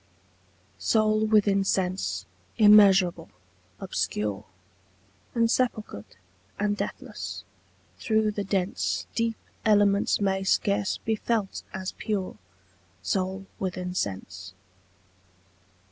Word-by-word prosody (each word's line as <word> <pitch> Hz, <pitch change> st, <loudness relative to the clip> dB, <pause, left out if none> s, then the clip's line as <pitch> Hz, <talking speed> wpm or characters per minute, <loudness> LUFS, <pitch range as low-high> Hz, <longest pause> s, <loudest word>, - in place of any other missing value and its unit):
SOUL 215 Hz, -, +2 dB
within 205 Hz, -2 st, +3 dB
sense, 180 Hz, -, -1 dB, 0.3 s
immeasurable, 195 Hz, -5 st, +6 dB, 0.5 s
obscure, 105 Hz, 0 st, -2 dB, 0.9 s
Insepulchred 230 Hz, -, -1 dB, 0.4 s
and 205 Hz, 0 st, +1 dB
deathless, -, -, -6 dB, 0.6 s
through 220 Hz, -2 st, +1 dB
the 205 Hz, -1 st, -3 dB
dense 190 Hz, -1 st, -1 dB
Deep 230 Hz, -1 st, -1 dB, 0.3 s
elements 205 Hz, -2 st, +3 dB
may 195 Hz, -1 st, 0 dB
scarce 200 Hz, +1 st, +1 dB
be 220 Hz, -, -1 dB
felt 215 Hz, -2 st, -2 dB
as 190 Hz, 0 st, -4 dB
pure 200 Hz, -4 st, -2 dB, 0.7 s
Soul 190 Hz, -, -2 dB
within 180 Hz, -1 st, -3 dB
sense. 95 Hz, -, -5 dB
195 Hz, 85 wpm, -26 LUFS, 180-215 Hz, 0.9 s, immeasurable